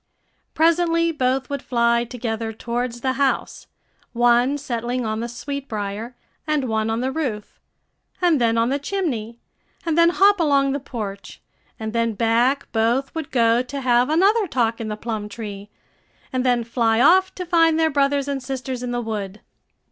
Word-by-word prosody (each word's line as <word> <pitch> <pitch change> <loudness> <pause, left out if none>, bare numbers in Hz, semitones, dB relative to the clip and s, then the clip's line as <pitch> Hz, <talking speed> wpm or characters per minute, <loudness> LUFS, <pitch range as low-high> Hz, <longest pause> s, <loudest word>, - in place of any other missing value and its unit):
Presently 335 +1 +3
both 265 -3 0
would 280 -2 -2
fly 235 -1 +1
together 225 -2 -4
towards 240 +1 -4
the 260 0 0
house, 270 -1 -1 0.5
one 240 +3 +3
settling 245 -2 -3
on 220 0 -2
the 235 - -3
sweetbrier, 235 -4 -5 0.3
and 300 -4 0
one 220 -1 0
on 225 +1 -1
the 260 +1 -1
roof, 255 -9 -4 0.6
and 340 -7 +3
then 230 -1 +2
on 230 +1 +2
the 280 +2 0
chimney, 270 - -3 0.5
and 325 -2 0
then 335 0 +5
hop 395 +3 +4
along 280 -4 +3
the 280 - -1
porch, 210 -7 -7 0.4
and 220 0 -4
then 230 -1 0
back 235 +5 +1
both 235 +4 0
would 320 -3 -5
go 235 -1 +3
to 275 +2 -6
have 245 0 +3
another 395 +7 +3
talk 230 -6 0
in 225 - -4
the 210 0 -4
plum 215 -2 -4
tree, 205 -2 -8 0.6
and 255 -1 0
then 245 -2 +2
fly 230 -1 +1
off 375 +7 +4
to 365 - -5
find 330 -2 +3
their 320 -1 +2
brothers 280 0 +1
and 280 -1 -2
sisters 255 0 -5
in 250 - -4
the 240 0 -2
wood. 210 -3 -5
250 Hz, 170 wpm, -22 LUFS, 230-285 Hz, 0.6 s, then